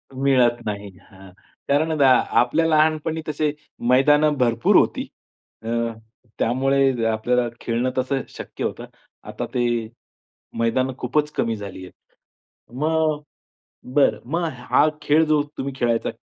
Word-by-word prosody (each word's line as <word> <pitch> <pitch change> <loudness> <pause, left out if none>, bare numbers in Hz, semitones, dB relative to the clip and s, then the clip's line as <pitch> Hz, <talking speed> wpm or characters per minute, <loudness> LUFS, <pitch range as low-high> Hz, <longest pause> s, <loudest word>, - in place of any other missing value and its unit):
मिळत 130 -3 +2
नाही 100 -1 -4 0.2
हं. 95 0 -14 0.4
कारण 155 +3 +2
आता 140 -4 +4 0.3
आपल्या 140 +7 +2
लहानपणी 155 0 +1
तसे 150 0 0 0.4
मैदानं 150 +3 +4
भरपूर 120 -2 +2
होती. - - +1 0.6
अ, 115 - -5 0.7
त्यामुळे 130 0 +1
आपल्याला 120 +2 0
खेळणं 120 +2 -1
तसं 130 +1 0
शक्य - - -8
होतं. - - -4 0.4
आता - - -4
ते 120 -1 +1 0.9
मैदानं 130 +3 +1
खूपच 150 +4 0
कमी 115 -1 -1
झाली 100 -3 -8
आहे. - - -13 0.9
मग 155 -1 +1 0.7
बरं, 145 - +3
मग 170 +1 0 0.3
हा 150 - +5
खेळ 150 +2 +3
जो 155 -1 +2 0.2
तुम्ही 140 0 -4
खेळायचा 120 -1 +1
135 Hz, 120 wpm, -22 LUFS, 120-150 Hz, 0.9 s, हा